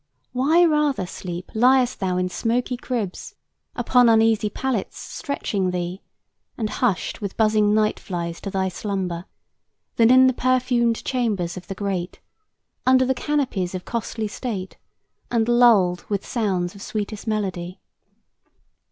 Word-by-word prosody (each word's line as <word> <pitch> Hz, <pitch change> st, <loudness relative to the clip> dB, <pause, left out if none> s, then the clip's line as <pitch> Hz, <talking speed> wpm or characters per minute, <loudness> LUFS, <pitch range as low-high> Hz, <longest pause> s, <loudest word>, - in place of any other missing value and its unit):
Why 305 Hz, +8 st, +4 dB
rather, 300 Hz, -, +1 dB
Sleep, 175 Hz, 0 st, -7 dB
liest 250 Hz, +2 st, +3 dB
thou 185 Hz, -2 st, 0 dB
in 180 Hz, 0 st, +1 dB
smoky 240 Hz, +6 st, -1 dB
cribs, 235 Hz, -6 st, -4 dB, 0.4 s
Upon 245 Hz, 0 st, +4 dB
uneasy 225 Hz, -1 st, +3 dB
pallets 245 Hz, -2 st, -3 dB
stretching 200 Hz, -9 st, -3 dB
thee, 180 Hz, +1 st, -3 dB, 0.6 s
And 215 Hz, -3 st, -2 dB
hushed 220 Hz, -6 st, -1 dB
with 200 Hz, -2 st, -5 dB
buzzing 215 Hz, -1 st, +3 dB
night 215 Hz, 0 st, +1 dB
flies 170 Hz, -2 st, -5 dB
to 200 Hz, -, -4 dB
thy 190 Hz, -1 st, 0 dB
slumber, 185 Hz, -2 st, -3 dB, 0.7 s
Than 230 Hz, -1 st, +5 dB
in 260 Hz, +1 st, +7 dB
the 260 Hz, -, +4 dB
perfumed 250 Hz, -2 st, +1 dB
chambers 210 Hz, -9 st, -1 dB
of 180 Hz, -1 st, -9 dB
the 195 Hz, -, -5 dB
great, 190 Hz, -3 st, -3 dB, 0.6 s
Under 260 Hz, 0 st, +4 dB
the 265 Hz, -, +2 dB
canopies 250 Hz, -10 st, -1 dB
of 180 Hz, -, -6 dB
costly 225 Hz, -1 st, -3 dB
state, 205 Hz, -3 st, -5 dB, 0.5 s
And 230 Hz, -2 st, +1 dB
lulled 220 Hz, -8 st, +4 dB
with 200 Hz, -2 st, -2 dB
sounds 190 Hz, -7 st, -1 dB
of 200 Hz, -, -13 dB
sweetest 215 Hz, +1 st, -5 dB
melody? 185 Hz, -4 st, -3 dB
215 Hz, 135 wpm, -23 LUFS, 185-245 Hz, 0.7 s, in